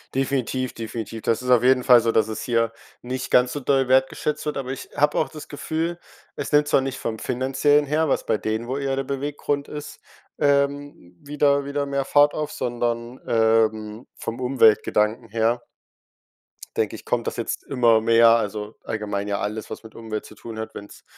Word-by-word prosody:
Definitiv, 130 -1 -1
definitiv. 115 -1 -6
Das 115 - +1
ist 125 - -5
auf 125 -2 +5
jeden 130 0 +4
Fall 125 -2 +7
so, 115 0 +1
dass 110 -1 +3
es 110 - -4
hier 115 -2 +1 0.3
nicht 130 +1 -4
ganz 125 0 +4
so 145 - -3
doll 135 -1 +1
wertgeschätzt 135 +3 +1
wird, 150 - -2
aber 130 -1 -4
ich 135 - -7
habe 145 +1 +2
auch - - +2
das 155 -2 -10
Gefühl, 165 +4 -3 0.4
es - - -4
nimmt 150 0 +5
zwar - - +4
nicht 135 -1 -4
vom 110 -1 -4
Finanziellen 135 +3 +2
her, 155 +3 +1
was 135 - 0
bei 110 - +1
denen, 110 +2 -3
wohl 135 +3 -2
eher 135 -1 -1
der 135 - -1
Beweggrund 140 +1 -3
ist, 150 0 -8 0.4
ähm, 140 - 0
wieder 140 -1 +1
wieder 140 0 -2
mehr 140 -1 -2
Fahrt 145 +1 +4
auf, 150 -1 -3
sondern, 120 0 -3
ähm, 110 -1 +1
vom 115 - -6
Umweltgedanken 115 -2 +3
her 115 +2 +1 1.2
denke - - 0
ich, - - -12
kommt - - -1
das - - -3
jetzt - - -3
immer 120 -4 +3
mehr, 115 +1 +6
also, 105 -1 0
allgemein 105 -2 -3
ja 100 -1 -1
alles, 105 +2 -4
was - - -7
mit 110 - -13
Umwelt 110 -2 -5
zu - - -13
tun 115 -1 -9
hat, 110 - -6
wenn's 100 - -11
125 Hz, 190 wpm, -23 LUFS, 110-140 Hz, 1.2 s, Fall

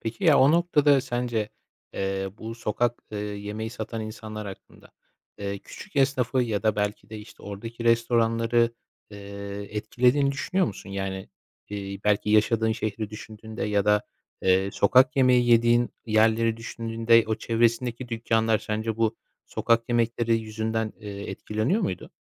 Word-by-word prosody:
Peki 115 - -5
ya, 155 -4 +6
o 140 +4 +6
noktada 150 -5 +4
sence, 120 -4 -2 0.5
eee, 95 0 -2
bu 115 +1 -6
sokak, 115 +1 -1
eee, 105 - -3
yemeği 105 +1 -5
satan 115 -1 -5
insanlar 110 -1 -7
hakkında, 95 - -12 0.5
eee, 100 0 -4
küçük - - -12
esnafı 130 -2 +2
ya 110 -4 -2
da, 110 -2 +1
belki 105 +1 -2
de, 110 - -6
işte, 105 - -13
oradaki 115 +4 -7
restoranları, 115 0 +2 0.4
eee, 100 0 -7
etkilediğini 125 +6 +2
düşünüyor 180 +6 0
musun? 100 -3 -7
Yani, 95 -1 -4 0.4
iii, 100 -1 -5
belki, 105 0 +2
yaşadığın 110 +1 +3
şehri 110 -1 -3
düşündüğünde 110 0 -8
ya 105 -1 +1
da, 105 0 +3 0.4
eee, 95 +1 +3
sokak 130 +10 +4
yemeği 125 -2 +4
yediğin 120 +1 +4 0.2
yerleri 110 +1 +3
düşündüğünde 115 0 +2
o 110 - 0
çevresindeki 115 +2 0
dükkânlar 115 -1 +1
sence 110 +1 -3
bu 115 -1 +1 0.3
sokak 115 0 +1
yemekleri 115 -1 +1
yüzünden, 110 0 -2
eee, 100 -1 -6
etkileniyor 110 - -1
muydu? 90 - -3
110 Hz, 140 wpm, -26 LUFS, 105-120 Hz, 0.5 s, ya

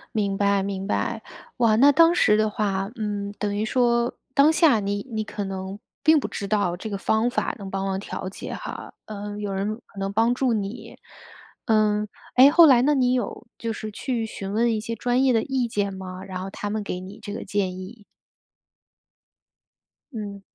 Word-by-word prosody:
明 200 -2 0
白， 200 -1 +2
明 195 0 -3
白。 225 +1 -1 0.3
哇， 230 -3 +4
那 280 +5 +7
当 330 +4 +6
时 210 -10 +4
的 215 0 +2
话， 195 -2 -1
嗯， 205 -3 -3
等 205 0 -1
于 210 - 0
说 235 +1 +2 0.2
当 290 +2 +6
下 315 -8 +4
你 200 +3 -3
你 220 -2 -2
可 210 -1 -5
能 190 +1 -5 0.2
并 310 +1 +6
不 235 - -3
知 200 -1 -5
道 200 -5 +1
这 185 +5 -6
个 200 - -3
方 220 +4 +1
法 255 - -1
能 195 -3 -8
帮 195 0 -2
忙 190 -1 -1
调 195 -1 -6
节 190 - -7
哈 - - -7
呃， 205 -1 -6
有 205 -1 -3
人 195 +2 -1
可 200 - -12
能 195 0 -2
帮 225 +4 +3
助 255 -1 +1
你。 215 +2 -5 0.7
嗯， 215 -1 +2 0.3
诶， 260 +2 +9
后 330 +3 +8
来 260 -5 +6
那 290 +4 +3
你 255 -3 +2
有 245 -3 -3
就 230 - -3
是 215 0 -5
去 235 +1 -2
询 195 -3 -6
问 230 +2 +2
一 - - -1
些 230 +1 -4
专 245 +3 +1
业 265 - +4
的 225 -2 +3
意 265 -3 -1
见 200 -2 -1
吗？ 185 -1 -7
然 185 -1 -5
后 195 - -5
他 205 +1 -5
们 215 0 -2
给 180 -2 -4
你 190 +3 -10
这 205 -1 -6
个 - - -6
建 190 -2 -1
议。 205 +3 -10 2.1
嗯。 205 -3 -6
210 Hz, 215 characters per minute, -24 LUFS, 200-235 Hz, 2.1 s, 诶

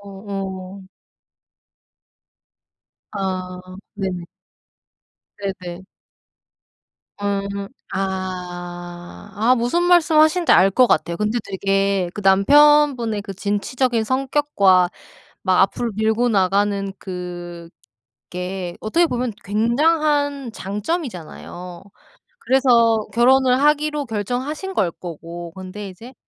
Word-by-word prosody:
어. 195 -1 -7 2.2
아 185 -2 -4 0.4
네네. 190 -3 -3 1.1
네네. 190 -3 -6 1.3
음. 200 0 -3 0.2
아. 175 -2 -5
아 225 +5 +3
무슨 245 +9 +1
말씀 345 -3 +4
하시는지 320 +3 +4
알 195 +1 +6
것 250 +5 +4
같아요. 170 -3 +1
근데 210 +5 0
되게 195 -1 0
그 210 - -5
남편분의 245 +2 +4
그 195 -1 -8
진취적인 220 +4 -1
성격과 260 -8 +2 0.5
막 185 -1 +3
앞으로 215 +4 +1
밀고 220 +3 +1
나가는 200 -1 +1
그게 175 - -8
어떻게 335 +11 +2
보면 250 -4 -2
굉장한 285 +4 +1
장점이잖아요. 190 - -5 0.6
그래서 235 - +3
결혼을 255 +2 +4
하기로 300 0 +2
결정하신 255 - -3
걸 185 - +1
거고. 170 0 -8
근데 190 +2 -7
이제 225 +8 -12
200 Hz, 190 characters per minute, -21 LUFS, 185-255 Hz, 2.2 s, 알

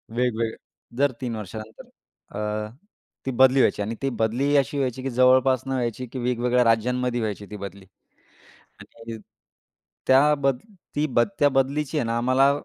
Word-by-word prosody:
वेगवेग 115 -2 0 0.4
दर 140 +1 +3
3 120 -3 -3
वर्षानंतर. 110 +1 -9 0.5
अ, 105 0 -3 0.6
ती 135 - -1
बदली 130 +1 +5
व्हायची 115 - +3
आणि 110 +3 -3
ती 135 - +1
बदलीही 130 +6 +1
अशी 140 +1 0
व्हायची, 130 -1 -2
की 135 - -2
जवळपास 130 +1 +4
न - - -3
व्हायची, 125 -1 -2
की 130 +2 -7
वेगवेगळ्या 125 0 +1
राज्यांमध्ये 120 +2 +1
व्हायची 105 -2 -3
ती 105 - -6
बदली. 100 -1 -9 1.0
आणि 115 0 -10 0.9
त्या 140 +3 +5
बद 135 -2 +1 0.4
ती 150 - +1
बद 120 -4 +2
त्या 145 - +5
बदलीची 135 +2 0
आहे - - 0
ना 115 0 -1
आम्हाला 130 +3 +3
125 Hz, 155 wpm, -24 LUFS, 115-135 Hz, 1.0 s, बदली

